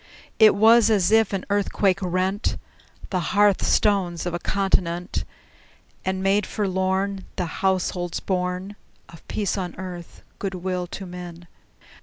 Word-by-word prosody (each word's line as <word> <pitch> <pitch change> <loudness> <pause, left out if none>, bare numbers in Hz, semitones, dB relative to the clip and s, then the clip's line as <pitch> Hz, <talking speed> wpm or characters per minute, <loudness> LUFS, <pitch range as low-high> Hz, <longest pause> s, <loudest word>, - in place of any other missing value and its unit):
It 215 -1 +7
was 225 +2 +6
as 205 -3 +3
if 220 -1 +4
an 195 -2 -3
earthquake 200 -1 +1
rent 185 +3 -1 0.5
The 185 - +1
hearth 205 +2 +3
stones 185 -5 +1
of 175 - -2
a 175 - -2
continent, 180 -2 0 0.8
And 190 0 -2
made 195 0 +2
forlorn 190 0 -1
The 180 - -1 0.2
households 185 -2 0
born 180 +1 -2 0.3
Of 165 - -15
peace 205 -1 -1
on 180 -2 -4
earth, 180 -2 -8 0.2
good 195 -2 -3
will 180 0 -3
to 190 +2 -7
men! 175 -1 -9
190 Hz, 135 wpm, -24 LUFS, 180-200 Hz, 0.8 s, It